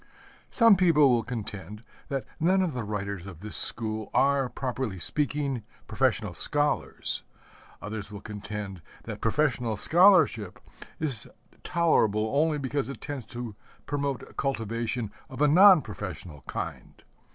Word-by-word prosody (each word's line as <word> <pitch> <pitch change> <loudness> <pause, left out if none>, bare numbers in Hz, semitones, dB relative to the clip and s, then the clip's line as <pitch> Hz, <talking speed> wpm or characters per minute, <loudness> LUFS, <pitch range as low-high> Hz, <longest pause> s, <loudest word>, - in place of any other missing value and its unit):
Some 230 -4 +6
people 160 -6 +5
will 120 -2 +3
contend 105 -3 -7 0.3
that 135 -2 -2
none 185 +4 +3
of 170 -5 -2
the 125 -2 -3
writers 100 -3 -4
of 90 -4 -10
this 105 +1 -6
school 110 -2 -1
are, 140 -2 +3
properly 125 -6 -3
speaking, 140 - +1 0.2
professional - - 0
scholars. 145 0 0 0.6
Others 105 0 -5
will 100 - -7
contend 105 -3 -7 0.2
that - - -7
professional 120 -3 0
scholarship 160 - +5 0.4
is 135 -10 -3 0.3
tolerable 110 -11 +2
only 155 +1 +2
because 140 0 -2
it 140 - -7
tends 140 -5 -6
to 120 -3 -6 0.3
promote 140 -2 -3
cultivation 115 -3 -2 0.2
of 130 - -9
a 150 - +5
non 180 +2 +7
professional 85 -6 -8
kind. - - -6
125 Hz, 130 wpm, -27 LUFS, 105-145 Hz, 0.6 s, non